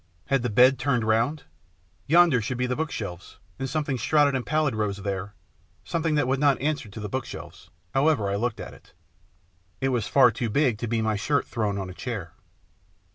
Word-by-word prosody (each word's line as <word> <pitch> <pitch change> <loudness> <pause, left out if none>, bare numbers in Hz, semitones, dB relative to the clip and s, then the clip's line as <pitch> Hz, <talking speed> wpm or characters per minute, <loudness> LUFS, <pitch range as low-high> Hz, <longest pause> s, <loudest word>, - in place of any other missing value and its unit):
Had 135 -2 +2
the 125 - -1
bed 125 +4 +5
turned 125 -5 +1
round? 115 +7 +1 0.6
Yonder 165 -5 +5
should 120 +3 -3
be 125 - 0
the 125 0 -1
bookshelves, 105 - -5 0.2
and 135 - -3
something 145 -3 -1
shrouded 145 +4 +3
and 130 -2 -1
pallid 155 -2 +1
rose 105 -2 -1
there, 100 0 -4 0.5
something 165 -2 -1
that 145 -4 +1
would 130 +1 +1
not 140 -2 +3
answer 145 -5 -2
to 100 - -9
the 105 - -4
bookshelves, 130 +4 -7 0.2
however 135 -5 +2
I 100 - -1
looked 115 +2 -2
at - - -7
it. - - -19 0.9
It 135 - 0
was 120 -5 -1
far 130 -4 +5
too 115 +1 -3
big 125 -2 +1
to 120 - -3
be 115 0 0
my 110 -1 0
shirt 140 +8 0
thrown 105 -4 -2
on 95 -1 -4
a 90 - -8
chair. 100 -6 -6
125 Hz, 195 wpm, -25 LUFS, 105-140 Hz, 0.9 s, bed